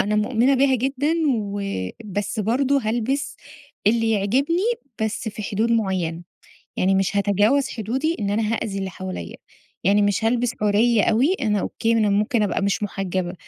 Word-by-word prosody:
أنا 210 Hz, +1 st, +1 dB
مؤمنة 240 Hz, +5 st, +2 dB
بيها 265 Hz, 0 st, +3 dB
جدًا 275 Hz, +5 st, 0 dB, 0.2 s
و 205 Hz, -2 st, -3 dB, 0.4 s
بس 205 Hz, +2 st, -3 dB
برضه 265 Hz, +6 st, +1 dB
هالبس 270 Hz, +6 st, -1 dB, 0.5 s
اللي 225 Hz, +1 st, +3 dB
يعجبني 260 Hz, -, +1 dB, 0.4 s
بس 220 Hz, +1 st, -2 dB
في 215 Hz, 0 st, -7 dB
حدود 220 Hz, +4 st, 0 dB
معيّنة. 185 Hz, -7 st, -1 dB, 0.6 s
يعني 190 Hz, +1 st, +2 dB
مش 195 Hz, +1 st, 0 dB
هاتجاوز 210 Hz, +7 st, +2 dB
حدودي 260 Hz, +9 st, -2 dB
إن 200 Hz, -, -1 dB
أنا 215 Hz, +2 st, 0 dB
هأذي 200 Hz, -3 st, -3 dB
اللي 190 Hz, -1 st, -3 dB
حواليّا. 90 Hz, -, -7 dB, 0.5 s
يعني 200 Hz, +3 st, +4 dB
مش 205 Hz, +2 st, +1 dB
هالبس 240 Hz, +1 st, +1 dB
عُرِي 210 Hz, +2 st, +3 dB
أوي، 260 Hz, +11 st, +3 dB
أنا 210 Hz, -3 st, +1 dB
أوكي 230 Hz, +4 st, -1 dB
أنا 215 Hz, -2 st, +2 dB
ممكن 210 Hz, +2 st, +1 dB
أبقى 200 Hz, -, -1 dB
مش 200 Hz, +1 st, 0 dB
مُحجّبة، 185 Hz, -2 st, -3 dB
215 Hz, 155 wpm, -22 LUFS, 200-245 Hz, 0.6 s, يعني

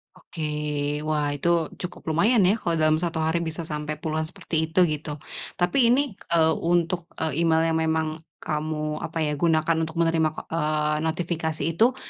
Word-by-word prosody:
Oke, 160 Hz, -, -8 dB, 0.6 s
wah 150 Hz, -2 st, +1 dB
itu, 165 Hz, +2 st, +1 dB
cukup 180 Hz, -, -6 dB
lumayan 205 Hz, +6 st, +4 dB
ya 205 Hz, +5 st, +3 dB
kalau 170 Hz, -1 st, 0 dB
dalam 155 Hz, -1 st, +3 dB
1 165 Hz, -2 st, -1 dB
hari 160 Hz, +2 st, +1 dB
bisa 165 Hz, 0 st, -3 dB
sampai 150 Hz, -1 st, -4 dB
puluhan 155 Hz, +1 st, -2 dB
seperti 160 Hz, 0 st, -2 dB
itu, 180 Hz, +3 st, +4 dB
gitu. 150 Hz, -2 st, -2 dB, 0.4 s
Tapi 235 Hz, +7 st, +3 dB
ini, 270 Hz, +3 st, +3 dB, 0.2 s
eee, 160 Hz, -1 st, +5 dB
untuk 170 Hz, +1 st, 0 dB
e 160 Hz, -2 st, -1 dB
email 165 Hz, -1 st, +3 dB
yang 160 Hz, -, +1 dB
memang 160 Hz, 0 st, 0 dB, 0.2 s
kamu, 155 Hz, 0 st, -2 dB
apa 160 Hz, 0 st, -2 dB
ya, 150 Hz, -, 0 dB
gunakan 160 Hz, 0 st, +3 dB
untuk 160 Hz, -, -9 dB
menerima, 165 Hz, -1 st, +2 dB
ko -, -, -5 dB
eee, 150 Hz, -1 st, +1 dB
notifikasi 160 Hz, -1 st, -2 dB
itu, 235 Hz, +9 st, +3 dB
160 Hz, 170 wpm, -25 LUFS, 155-170 Hz, 0.6 s, eee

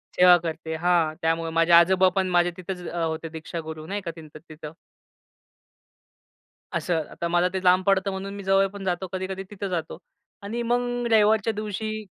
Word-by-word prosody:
सेवा 180 Hz, -1 st, +7 dB
करते 160 Hz, -1 st, -4 dB
हां 170 Hz, -3 st, +2 dB
त्यामुळे 165 Hz, 0 st, 0 dB
माझे 165 Hz, +1 st, +2 dB
आजोबा 185 Hz, +2 st, +6 dB
पण 190 Hz, -1 st, +1 dB
माझे 175 Hz, 0 st, +2 dB
तिथेच 180 Hz, -1 st, -6 dB
अ, 175 Hz, -, -6 dB
होते 160 Hz, 0 st, -3 dB
दीक्षागुरू 160 Hz, -1 st, -7 dB
नाही 205 Hz, +3 st, -3 dB
का 170 Hz, -3 st, -5 dB
त्यांचं 155 Hz, -2 st, -13 dB
तिथं. 155 Hz, 0 st, -9 dB, 2.0 s
असं 165 Hz, -3 st, 0 dB
आता 170 Hz, -, -4 dB
मला 175 Hz, +1 st, +2 dB
ते 190 Hz, 0 st, -3 dB
लांब 185 Hz, +1 st, +4 dB
पडतं 195 Hz, 0 st, +2 dB
म्हणून 195 Hz, +1 st, -5 dB
मी 200 Hz, -, -7 dB
जवळ 195 Hz, 0 st, +3 dB
पण 200 Hz, 0 st, -9 dB
जातो 185 Hz, +1 st, -2 dB
कधी-कधी 190 Hz, +1 st, -4 dB
तिथं 200 Hz, -1 st, -5 dB
जातो 165 Hz, -3 st, -4 dB, 0.5 s
आणि 230 Hz, +4 st, -4 dB
मग 245 Hz, 0 st, -1 dB
रविवारच्या 220 Hz, 0 st, +4 dB
दिवशी 215 Hz, +1 st, -4 dB
180 Hz, 165 wpm, -25 LUFS, 165-200 Hz, 2.0 s, सेवा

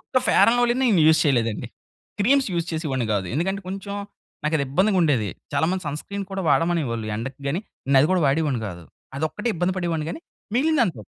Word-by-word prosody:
ఒక్క 255 Hz, -1 st, 0 dB
fair -, -, +6 dB
and 245 Hz, -, +1 dB
లవ్లీ‌నే 245 Hz, +2 st, +2 dB
నేను 190 Hz, -6 st, +4 dB
use 160 Hz, 0 st, +5 dB
చేయలేదండి. 115 Hz, -7 st, +1 dB, 0.5 s
క్రీమ్స్ 265 Hz, +4 st, +3 dB
యూజ్ 170 Hz, -1 st, -1 dB
చేసేవాడిని 135 Hz, -7 st, -2 dB
గాదు. 100 Hz, -2 st, -1 dB
ఎందుకంటే 190 Hz, +6 st, -1 dB
కొంచెం 195 Hz, +1 st, -5 dB, 0.5 s
నాకు 150 Hz, +1 st, +1 dB
అది 140 Hz, -, 0 dB
ఇబ్బందిగ 190 Hz, +8 st, +2 dB
ఉండేది. 130 Hz, -10 st, +2 dB, 0.2 s
చాలా 145 Hz, +2 st, +2 dB
మంది 185 Hz, 0 st, -2 dB
సన్ 145 Hz, +1 st, -3 dB
స్క్రీన్ 200 Hz, 0 st, -5 dB
కూడా 195 Hz, 0 st, -3 dB
వాడమనేవాళ్ళు 140 Hz, -7 st, +1 dB
ఎండకి 130 Hz, +5 st, -6 dB
గాని. 165 Hz, +7 st, -1 dB, 0.3 s
నేను 135 Hz, -1 st, +5 dB
అది 150 Hz, -, +3 dB
గూడా 180 Hz, -3 st, +2 dB
వాడేవాడిని 140 Hz, -3 st, +1 dB
గాదు. 85 Hz, -3 st, -8 dB, 0.3 s
అదొక్కటే 160 Hz, +10 st, -2 dB
ఇబ్బంది 180 Hz, +2 st, 0 dB
పడేవాడిని 170 Hz, -4 st, -1 dB
గాని -, -, -6 dB, 0.3 s
మిగిలినదంత 240 Hz, -, +1 dB
160 Hz, 190 wpm, -23 LUFS, 135-195 Hz, 0.5 s, fair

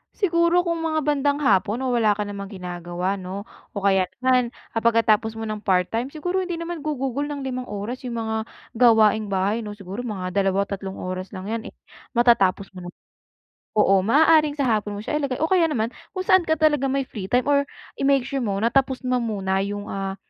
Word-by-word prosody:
Siguro 340 Hz, -2 st, +2 dB
kung 335 Hz, -1 st, -1 dB
mga 315 Hz, -1 st, -1 dB
bandang 285 Hz, 0 st, +1 dB
hapon 210 Hz, +2 st, +2 dB
o 260 Hz, -, 0 dB
wala 220 Hz, -4 st, +3 dB
ka 210 Hz, -, -2 dB
namang 200 Hz, -1 st, -6 dB
ginagawa 180 Hz, 0 st, -4 dB
'no, 190 Hz, +2 st, -6 dB, 0.3 s
o 200 Hz, -, -4 dB
kaya 190 Hz, -2 st, +3 dB, 0.2 s
naman 255 Hz, -1 st, +3 dB, 0.2 s
ang 225 Hz, -, -2 dB
pagkatapos 225 Hz, -1 st, +3 dB
mo 225 Hz, -, -5 dB
ng 215 Hz, -1 st, -4 dB
part-time 200 Hz, +5 st, 0 dB
siguro 355 Hz, +6 st, -2 dB
hindi 365 Hz, -2 st, -2 dB
naman 335 Hz, 0 st, -5 dB
gugugol 285 Hz, -2 st, -2 dB
ng 290 Hz, -2 st, -5 dB
5 255 Hz, -1 st, -4 dB
oras 210 Hz, +5 st, -5 dB
yung 240 Hz, -, -4 dB
mga 220 Hz, 0 st, -2 dB, 0.3 s
gawaing 220 Hz, -3 st, +5 dB
bahay, 200 Hz, +3 st, 0 dB
'no? 210 Hz, -2 st, -6 dB
Siguro 200 Hz, +2 st, -7 dB
mga 185 Hz, -4 st, -4 dB
2 195 Hz, 0 st, +1 dB
o -, -, -11 dB
3 195 Hz, -1 st, -5 dB
oras 185 Hz, 0 st, -5 dB
lang 190 Hz, +3 st, -6 dB
yan 230 Hz, +2 st, -3 dB
eh, -, -, -22 dB, 0.4 s
matatapos 200 Hz, -5 st, +3 dB
mo 180 Hz, -2 st, -9 dB
na. -, -, -5 dB, 0.9 s
Oo, 195 Hz, -2 st, +5 dB
maaaring 305 Hz, +4 st, +4 dB
sa -, -, +2 dB
hapon 210 Hz, -1 st, -1 dB
mo -, -, -5 dB
siya 300 Hz, -, -1 dB
ilagay 270 Hz, -4 st, -2 dB
o 320 Hz, -, +1 dB
kaya 355 Hz, -3 st, +4 dB
naman 230 Hz, -5 st, -1 dB, 0.2 s
kung 370 Hz, -, -2 dB
saan 375 Hz, -1 st, +5 dB
ka 315 Hz, -, +3 dB
talaga 295 Hz, -3 st, +3 dB
may 275 Hz, 0 st, 0 dB
free 195 Hz, -4 st, -6 dB
time 250 Hz, +1 st, +3 dB
or 285 Hz, -1 st, +4 dB, 0.4 s
i-make 275 Hz, -1 st, +3 dB
sure 275 Hz, -, -2 dB
mo 200 Hz, -4 st, -1 dB
na 230 Hz, +3 st, +1 dB
tapos 265 Hz, -1 st, +1 dB
mo 250 Hz, 0 st, +1 dB
muna 195 Hz, -5 st, -1 dB
yung, 205 Hz, 0 st, -5 dB
ah, 195 Hz, 0 st, -3 dB
225 Hz, 205 wpm, -23 LUFS, 200-280 Hz, 0.9 s, gawaing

